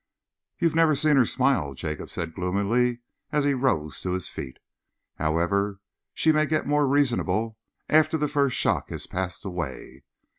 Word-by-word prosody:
"You've 170 -3 +1
never 160 -2 +4
seen 150 +1 +3
her 125 -4 +5
smile," 125 - +1
Jacob 75 +3 -5
said 80 -1 -4
gloomily, 100 +7 0 0.3
as 150 -2 +2
he 145 0 +2
rose 125 - -1
to 90 - -2
his 95 -2 -2
feet. 65 - -7 0.6
"However, 95 +6 0 0.4
she 160 - +4
may 155 0 +2
get 155 0 0
more 145 0 +2
reasonable 120 -5 +1 0.3
after 155 +1 +4
the 150 -1 0
first 140 -3 +1
shock - - +1
has - - -4
passed 90 0 -4
away.... 75 -7 -6
120 Hz, 155 wpm, -25 LUFS, 90-145 Hz, 0.6 s, her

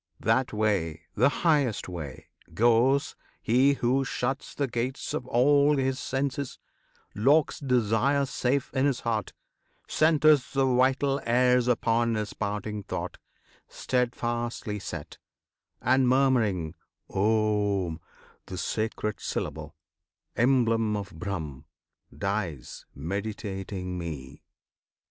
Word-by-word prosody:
That 115 +4 +2
way 95 -7 0
the 125 +6 +4
highest 145 - +1
way 80 -7 -7 0.3
goes 120 +6 +3 0.2
he 130 +5 +3
who 135 +1 +1
shuts 135 +1 -3
The 140 - 0
gates 125 +3 -3
of 125 - -3
all 140 +4 +4
his 135 -1 0
senses, 135 0 -2 0.6
locks 140 +8 +3
desire 125 +1 +2
Safe 130 +1 -1
in 135 +1 +2
his 135 -3 -1
heart, 110 -4 -2 0.5
centres 155 -3 +4
the 135 -1 +3
vital 135 +2 +2
airs 125 +1 +3
Upon 115 -1 +2
his 105 -1 -3
parting 105 0 -3
thought, - - -5 0.5
steadfastly 120 -3 -2
set; 95 - -7 0.6
And, 130 +1 +4
murmuring 115 - +2 0.3
OM, 105 -5 +1 0.5
the 95 - -6
sacred 110 +1 -2
syllable 75 0 -4 0.6
Emblem 115 -4 +2
of 100 -2 -6
BRAHM 80 -6 -5 0.5
dies, 100 - -3
meditating 95 +1 -4
Me. 75 -5 -7
115 Hz, 105 wpm, -27 LUFS, 100-130 Hz, 0.6 s, the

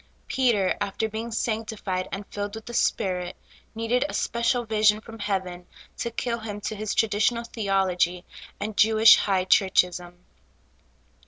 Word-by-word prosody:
Peter, 235 -8 +1
after 205 +2 -1
being 220 +2 -5
sanctified 215 -5 -3
and 200 +1 -5
filled 205 +1 -5
with 225 - -9
the 240 - -8
Spirit, 185 -6 0 0.4
needed 230 +3 +1
a - - -5
special 235 +1 0
vision 215 -1 +3
from 225 +1 -12
heaven 185 -3 -3 0.3
to 235 - -3
kill 235 0 -3
him 210 -2 -6
to 215 - -4
his 215 0 -3
traditional 225 +2 +1
theology 190 -5 0 0.3
and 215 0 -4
Jewish 220 +1 +7
high 190 -2 +1
churchism. 180 -2 +2
210 Hz, 140 wpm, -25 LUFS, 190-225 Hz, 0.4 s, Jewish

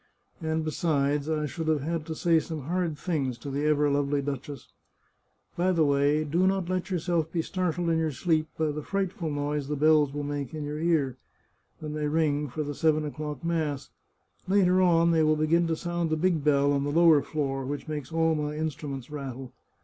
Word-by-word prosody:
And, 160 0 -1
besides, 150 -2 0
I 155 -1 0
should 160 +2 -5
have 155 -3 +2
had 160 0 -3
to 160 - -4
say 165 0 +3
some 155 0 -5
hard 170 +1 -2
things 140 -6 -2
to 140 +4 -7
the 145 +2 -1
ever 150 -1 +3
lovely 145 0 +1
duchess. 140 -1 -5 0.9
By 180 +2 +2
the 165 -4 +3
way, 145 +2 +2
do 170 +5 +1
not 190 -2 0
let 185 +1 -2
yourself 170 -3 -1
be 165 -2 -1
startled 175 -1 -2
in 165 - +2
your 160 -1 +1
sleep 155 +3 0
by 155 -1 +1
the 150 +1 -4
frightful 190 -1 -2
noise 145 -1 -2
the 150 - -2
bells 150 -1 +4
will 145 +1 -4
make 145 0 -4
in 155 - -4
your 150 +1 -4
ear, 155 -6 +1 0.6
when 150 -1 -5
they 150 -1 -1
ring 150 -2 +1
for 150 +5 -3
the 145 0 -4
seven 155 0 +2
o'clock 150 -1 -5
mass; 155 -5 -2 0.6
later 185 -1 +4
on 170 -2 +4
they 165 -1 +3
will 155 0 +4
begin 165 +3 +2
to 165 - 0
sound 175 0 -2
the 155 - 0
big 165 -2 +1
bell 145 -1 +3
on 140 0 +1
the 145 - -1
lower 160 -1 +5
floor, 135 -2 -2
which 140 +2 -5
makes 150 -3 -5
all 165 0 +2
my 150 -1 -2
instruments 145 -4 -4
rattle. 135 -3 -6
155 Hz, 205 wpm, -27 LUFS, 145-165 Hz, 0.9 s, lower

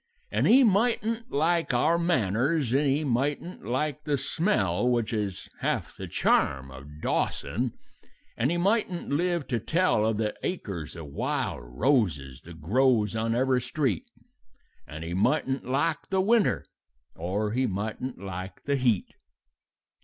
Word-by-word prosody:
"And - - +2
he 265 +4 +7
mightn't 230 +1 +1
like 165 -1 +1
our 160 +7 +3
manners, 135 - +1
and 140 +2 +3
he 145 +3 +1
mightn't 145 +6 -1
like 150 +4 -1
the 145 -2 0
smell 125 - +1
Which 120 -2 0
is 105 -4 -3
half - - -2
the - - -7
charm 65 -1 +1
of 75 +3 -11
Dawson; 120 0 -1 0.6
and 125 - +1
he 175 - 0
mightn't 190 -1 0
live 170 +1 0
to 120 - 0
tell 165 - +2
Of 110 -2 0
the 105 -1 -1
acres 90 - -4
of 80 -2 -7
wild 70 -3 -2
roses 70 - 0
that 85 -1 -11
grows 115 - +3
on 115 +1 0
every 130 0 +2
street; 150 - -1 0.8
And 75 +2 -7
he 85 +1 -4
mightn't 130 +8 +1
like 150 +5 0
the 190 - +1
winter, 215 +3 +3 0.5
or 100 +5 -2
he 130 +3 +1
mightn't 110 +5 -4
like 95 -1 -7
the 140 0 0
heat. 120 -7 +1
125 Hz, 145 wpm, -27 LUFS, 100-160 Hz, 0.8 s, he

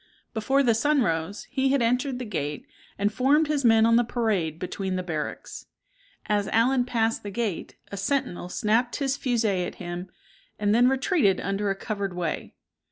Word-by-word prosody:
Before 265 +5 +2
the 235 -3 +4
sun 285 +4 +2
rose, 165 +2 -2
he 270 -1 +1
had 275 -1 +2
entered 250 +3 +1
the 250 - -5
gate, 150 -8 -4 0.3
and 205 +1 0
formed 285 +6 +3
his 295 -2 -1
men 225 -2 +5
on 230 0 +5
the 240 - +4
parade 215 -10 -1
between 185 +2 -3
the 185 - -2
barracks. 155 -4 -5 0.6
As 205 -1 0
Allen 245 +3 +2
passed 225 -2 0
the 205 - -6
gate, 200 -4 -3 0.2
a 200 - -5
sentinel 200 -5 -1
snapped 230 +4 +1
his 275 -2 0
fusee 225 -9 0
at - - -5
him, 175 +1 -6 0.5
and 205 0 +1
then 240 +2 +5
retreated 265 - +2
under 195 +1 -1
a 195 - 0
covered 200 -2 -4
way. 170 -3 -3
220 Hz, 175 wpm, -26 LUFS, 190-250 Hz, 0.6 s, men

